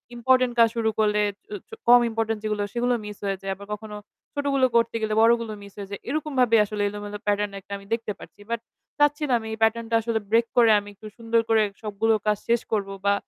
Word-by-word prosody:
Important 255 +1 +3
কাজ 230 -1 +7
শুরু 225 -1 +1
করলে 210 -1 +3 0.3
চ - - -19 0.2
চ - - -35 0.2
কম 245 +1 +9
ইম্পোর্টেন্ট 225 -1 -2
যেগুলো 210 -1 -1
সেগুলো 245 +1 +1
মিস 210 -1 -8
হয়ে 195 -1 -1
যায়। 195 0 -3
আবার 200 +1 -11
কখনো 210 0 -7 0.4
ছোটগুলো 280 -2 +1
করতে 230 0 +2
গেলে 215 -1 -1
বড়গুলো 230 0 +3
মিস 200 -1 -13
হয়ে 200 -1 -7
যায়। 200 - -6
এরকম 305 +2 -2
ভাবেই 230 -3 +5
আসলে 210 0 -4
এলোমেলো 205 0 -6
প্যাটার্ন 205 -1 0 0.2
আমি 200 - -14
দেখতে 230 -2 -2
পারছি। - - -14
বাট 235 0 -1 0.4
চাচ্ছি 295 +1 +3
না - - +2
আমি 220 - -8
এই - - -5
প্যাটার্ন 225 +1 +2
টা - - +3
আসলে 225 0 -1
ব্রেক 230 +1 +4
করে 230 -2 +6
আমি 205 0 -10
একটু 215 +2 -12
সুন্দর 230 0 +1
করে 225 -1 +4 0.2
সবগুলো 220 +1 0
কাজ 210 0 +3
শেষ 235 0 +2
করব 205 -3 0 0.2
বা 200 - +4
225 Hz, 220 wpm, -24 LUFS, 210-235 Hz, 0.4 s, কম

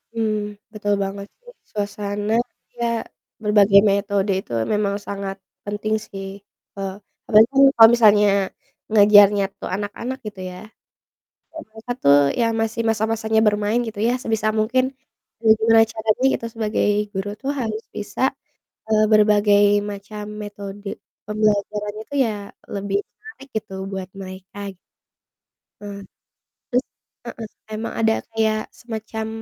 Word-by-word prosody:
Mhm, 215 -2 -1 0.2
betul 205 -1 -1
banget 200 +1 -5
sih, - - -15 0.2
suasana 205 0 -3 0.4
iya, 240 -1 -3 0.6
berbagai 205 -1 +6
metode 200 0 0
itu 190 - -11 0.2
memang 205 -1 0
sangat 195 -1 -4 0.3
penting 210 +1 -1
sih, 195 -1 -7 0.5
eee, 195 -1 -3 0.3
apalagi 215 0 +7
kan 275 0 +4
kalau 225 -1 +9
misalnya 210 -3 +5 0.6
ngajarnya 205 -1 +7 0.2
tuh - - -5
anak-anak, 210 +6 -4
gitu 205 -2 -8
ya. 180 - -9 1.0
Ya 320 - -9
mereka 220 +2 -11
tuh 140 0 +6 0.2
ya, 230 - +3
masih 225 +1 -1
masa-masanya 220 0 +1
bermain 210 +2 +2
gitu 220 -2 -8
ya, - - +2
sebisa 220 -2 0
mungkin 250 +4 +2 0.6
ya 220 - +4
gimana 225 0 +5
caranya 220 +2 0
gitu, 230 - -3
sebagai 220 -1 0 0.3
guru 195 0 -3
tuh 275 - -1
harus 220 -2 -3
bisa, 205 - -6 0.7
eee, 215 -1 +3
berbagai 210 -1 +5 0.3
macam 205 +1 -7 0.2
metode 205 0 -8 0.4
pembelajarannya 210 0 -1
itu 285 - -10
ya, 230 - 0 0.4
lebih 200 0 -1
menarik 435 -10 -14
gitu 215 -2 -4 0.2
buat 190 -1 -5
mereka. 190 +1 -8 1.0
Ah, 200 -1 -7 0.7
terus 250 +2 +2 0.4
heeh, 225 -2 -7 0.3
emang 220 +2 -4
ada 225 0 +3 0.2
kayak 220 -1 +1
semacam 220 -1 -6
210 Hz, 125 wpm, -22 LUFS, 200-220 Hz, 1.0 s, kalau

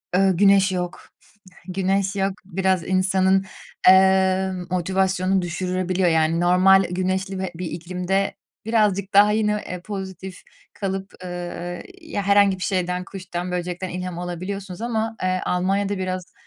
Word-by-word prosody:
Iıı, 190 -2 +3
güneş 195 -1 +5
yok. 180 -1 -4 0.6
Güneş 195 +1 0
yok, 195 0 0
biraz 190 -1 0
insanın, 190 0 +2 0.4
eee, 190 0 +5 0.2
motivasyonunu 190 +1 +1
düşürebiliyor. 180 +1 -1
Yani 160 +1 +2
normal 185 +2 +5
güneşli 185 +1 -2
bir 190 -1 -2
bir 180 +1 -5
iklimde 180 +3 -2 0.3
birazcık 205 -4 +1
daha, 205 +1 +6
yine, 210 -1 +1 0.2
eee, 180 -1 -6
pozitif 190 -2 -7 0.3
kalıp, 195 -1 -4
ııı, 175 0 -5 0.2
ya, 315 -11 -4
herhangi 200 -1 +4
bir 180 - -5
şeyden, 180 -1 -1
kuştan, 180 -2 -6
böcekten 180 +1 -3
ilham 180 -1 -5
alabiliyorsunuz 185 +3 -5
ama, 225 -1 -2
eee, 185 0 0
Almanya'da 195 +2 0
biraz, 185 -1 -4
190 Hz, 130 wpm, -22 LUFS, 180-195 Hz, 0.6 s, daha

